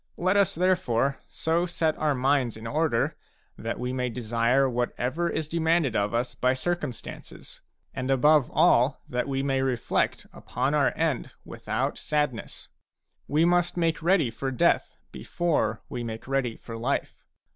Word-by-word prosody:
Let 185 +3 +1
us 200 -3 +3
therefore 155 -8 +1
so 170 +2 0
set 160 -2 0
our 150 -2 +1
minds 130 -3 +1
in 110 - -10
order 145 -1 0 0.4
that 115 +1 -4
we 125 +1 -2
may 125 -1 -1
desire 120 +3 +1
whatever 125 +6 -1
is 155 -2 -2
demanded 160 -5 +1
of 100 0 +1
us 120 +2 -1
by 125 +1 +1
circumstances, 150 -4 -5 0.3
and 130 +1 -4
above 145 +1 +4
all 125 +4 +3
that 125 +1 -2
we 135 -1 -1
may 135 -1 +1
reflect 130 -3 0
upon 130 +3 -2
our 145 -2 +3
end 160 -6 -1
with - - -11
out - - -1
sadness. 150 -6 -2 0.6
We 155 +3 +3
must 175 0 +2
make 165 -2 +1
ready 165 -7 +3
for 135 +4 -3
death 130 - +1
before 150 -10 -1
we 120 - -5
make 115 0 -6
ready 135 -4 0
for 115 -1 -8
life. 130 +5 -2
135 Hz, 155 wpm, -26 LUFS, 125-160 Hz, 0.6 s, above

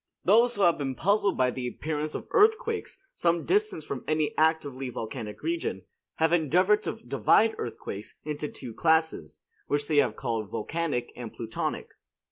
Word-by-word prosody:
Those 235 +5 +5
who 205 - +1
have 170 -3 +4
been 135 -2 -2
puzzled 200 +4 +2
by 125 -1 +3
the 125 0 -4
appearance 150 +3 -3
of - - -5
earthquakes 445 +2 +2 0.2
some 170 -1 +1
distance 410 - +1
from 135 - -5
any 155 -1 0
actively 145 -5 +1
volcanic 110 -2 -6
region, 335 +1 -2 0.3
have 160 +1 +2
endeavored 180 +6 +3
to - - -3
divide 225 0 +2
earthquakes 105 -3 -6
into 150 0 -3
two 125 -5 -9
classes, 160 - +1 0.3
which 145 0 0
they 155 - +1
have 145 - +3
called 115 -5 -3
volcanic 125 +1 -2
and 120 -3 -7
plutonic. 115 -1 -4
155 Hz, 155 wpm, -28 LUFS, 125-195 Hz, 0.3 s, Those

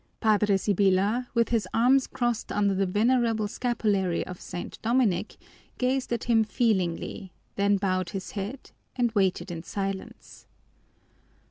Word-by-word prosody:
Padre 210 -2 +3
Sibyla, 200 +4 +2
with 235 0 +2
his 230 -3 0
arms 255 +3 +4
crossed 240 -2 -2
under 205 -1 +2
the 195 0 +1
venerable 225 +2 +2
scapulary 205 -6 0
of 180 -1 -9
St. 175 -1 -7
Dominic, 220 -5 +1 0.4
gazed 255 0 0
at 235 -1 -1
him 230 -2 +3
feelingly, 195 -4 -1 0.2
then 200 0 +2
bowed 185 -2 -1
his 195 -2 -6
head 210 +6 -6 0.2
and 240 -2 +1
waited 190 -3 0
in 165 -1 -5
silence. 195 +2 -6
205 Hz, 130 wpm, -27 LUFS, 190-235 Hz, 0.4 s, arms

